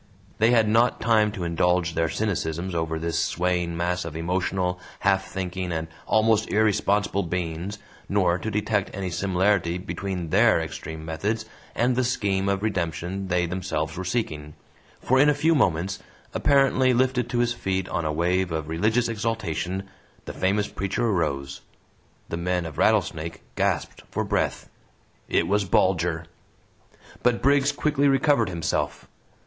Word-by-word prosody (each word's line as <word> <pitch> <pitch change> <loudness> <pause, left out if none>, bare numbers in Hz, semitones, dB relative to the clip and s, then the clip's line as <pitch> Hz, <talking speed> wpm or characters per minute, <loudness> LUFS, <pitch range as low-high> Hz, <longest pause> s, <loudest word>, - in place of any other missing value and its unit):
They 110 +2 +5
had 115 -3 +4
not 115 +3 +3
time 110 -1 +3
to 95 -5 -4
indulge 85 0 +1
their 80 0 +1
cynicisms 90 -4 -2
over 80 -1 -1
this 85 +1 -1
swaying 90 -1 -1
mass 90 +1 -1
of 80 -2 -7
emotional, 90 +2 -1 0.2
half 95 -1 +2
thinking, 90 -1 -4
and 80 -1 -2 0.2
almost 110 0 +3
irresponsible 105 -1 +2
beings, 90 +2 -3 0.3
nor 90 -3 +2
to 110 - -3
detect 105 -1 0
any 95 -2 -3
similarity 95 -1 +1
between 90 -2 -4
THEIR - - +5
extreme 80 0 -6
methods 105 +8 -2 0.3
and 125 +2 +2
the 130 - +2
scheme 100 -5 0
of 100 +1 -1
redemption 95 -1 -2
they 90 -1 +1
themselves 85 -3 -3
were 95 - -4
seeking, 80 -8 -3 0.4
for 130 +1 +2
in 145 +2 +6
a 150 - +3
few 160 +3 +3
moments, 95 - +1 0.3
apparently 135 -2 +3
lifted 125 -1 +1
to 120 - -1
his 120 0 +2
feet 95 -5 -2
on 85 - -2
a 80 - 0
wave 90 +3 +1
of 80 -1 -3
religious 110 +9 +1
exultation, 105 -5 -2 0.4
the - - -6
famous 100 +3 +1
preacher 100 +5 -2
arose. 75 -10 -1 0.7
The 85 - -3
men 90 0 -1
of 80 -1 -7
Rattlesnake 85 -6 +1
gasped - - -1
for - - -2
breath. - - -1 0.6
It - - +2
was 105 +1 +2
Bulger! 90 -3 +1 1.0
But 120 -1 +1
Briggs 140 +1 +4
quickly 145 -1 +1
recovered 135 -4 +3
himself. 85 -3 -2
95 Hz, 150 wpm, -25 LUFS, 85-110 Hz, 1.0 s, in